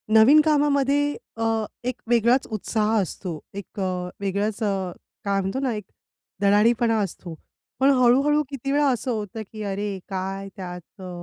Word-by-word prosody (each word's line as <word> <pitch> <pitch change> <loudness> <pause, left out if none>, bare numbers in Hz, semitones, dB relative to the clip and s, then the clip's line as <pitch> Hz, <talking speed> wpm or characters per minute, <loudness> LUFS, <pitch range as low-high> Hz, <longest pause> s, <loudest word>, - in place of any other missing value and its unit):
नवीन 255 +8 +8
कामामध्ये 290 -2 +3 0.4
अ, 225 -1 0 0.2
एक 250 0 -2
वेगळाच 240 +2 +3
उत्साह 215 0 0
असतो 175 -3 -5
एक 200 +1 -8
अ, 180 -1 -2
वेगळाच 200 +2 -1
अ, 195 -3 -1 0.3
काय 200 -1 +1
म्हणतो 195 +7 -2
ना 265 -3 0
एक 210 - -5 0.6
धडाडीपणा 225 +3 +4
असतो, 185 -3 -4 0.5
पण 270 +1 +5
हळूहळू 275 +5 +4
किती 275 -1 -4
वेळा 290 +1 +3
असं 250 +1 -1
होतं 215 -1 -4
की 215 -1 -6
"अरे! 200 0 -3
काय 195 +1 -3
त्यात 180 +1 -9
अ, 185 - -7
215 Hz, 150 wpm, -24 LUFS, 195-255 Hz, 0.6 s, नवीन